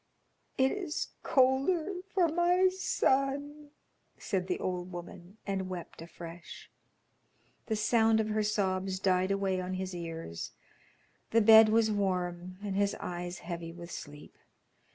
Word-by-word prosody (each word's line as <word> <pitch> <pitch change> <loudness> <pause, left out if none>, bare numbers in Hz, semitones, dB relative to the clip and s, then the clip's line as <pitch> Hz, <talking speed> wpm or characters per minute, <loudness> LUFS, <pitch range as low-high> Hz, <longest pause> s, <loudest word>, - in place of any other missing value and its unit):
"It 265 0 +3
is 360 -6 -3
colder 275 +8 +2 0.2
for 365 -3 +3
my 350 +3 +3
son," 285 -4 0 0.5
said 185 -2 -2
the 180 - -1
old 180 0 -3
woman, 175 +2 -9
and 190 -2 -2
wept 175 -3 -7
afresh. 170 0 -10 1.0
The 220 - 0
sound 220 +1 +3
of 215 0 0
her 215 0 +1
sobs 190 -3 0
died 185 -1 +2
away 195 -2 0
on 185 +1 -3
his 185 0 -4
ears. 165 - -6 0.8
The 230 - +4
bed 220 0 +9
was 220 0 +3
warm, 185 -3 -2
and 200 -2 -3
his 200 0 +1
eyes 175 0 -5
heavy 170 -1 -5
with 170 0 -10
sleep. 145 -2 -9
195 Hz, 130 wpm, -31 LUFS, 180-245 Hz, 1.0 s, bed